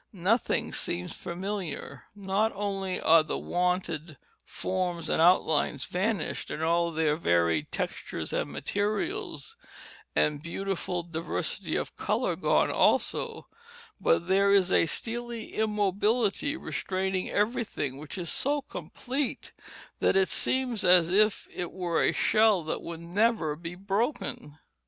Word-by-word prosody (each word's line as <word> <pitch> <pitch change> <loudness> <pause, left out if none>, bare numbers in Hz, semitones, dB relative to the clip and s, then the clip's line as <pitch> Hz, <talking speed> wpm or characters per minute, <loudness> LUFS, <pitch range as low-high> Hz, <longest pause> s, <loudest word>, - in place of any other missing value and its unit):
Nothing 205 +5 0
seems 90 +1 -2
familiar; 175 -6 -5
not 200 +2 0
only 195 -2 -2
are 165 0 +6
the 155 - -3
wonted 175 -4 -1 0.3
forms 180 -3 -3
and - - +2
outlines 160 -5 +3
vanished, 200 +4 -2
and 155 - -4
all 170 +1 +2
their 155 -2 +1
varied 85 - +1
textures - - -4
and - - -1
materials 340 - -2 0.6
and 150 -1 +2
beautiful 180 +1 -3
diversity 165 -1 -2
of - - -3
color - - 0
gone - - +2
also, - - +1 0.5
but 165 +1 +2
there 195 +1 +4
is 190 -2 +4
a - - +4
steely 235 +4 -4
immobility 210 - +1
restraining 190 - -2
everything 205 - -1
which 150 +5 -7
is 175 -3 -2
so 285 +1 +1
complete 270 0 -4 0.5
that - - +3
it 190 -1 +4
seems 250 -5 +1
as 180 -2 +6
if 210 +3 +2
it 175 -1 -4
were 175 -3 -1
a - - +3
shell 215 -5 +3
that 155 - -3
could 170 -1 -7
never 175 -2 +1
be 165 +2 -7
broken. 195 - -2
185 Hz, 125 wpm, -28 LUFS, 165-210 Hz, 0.6 s, are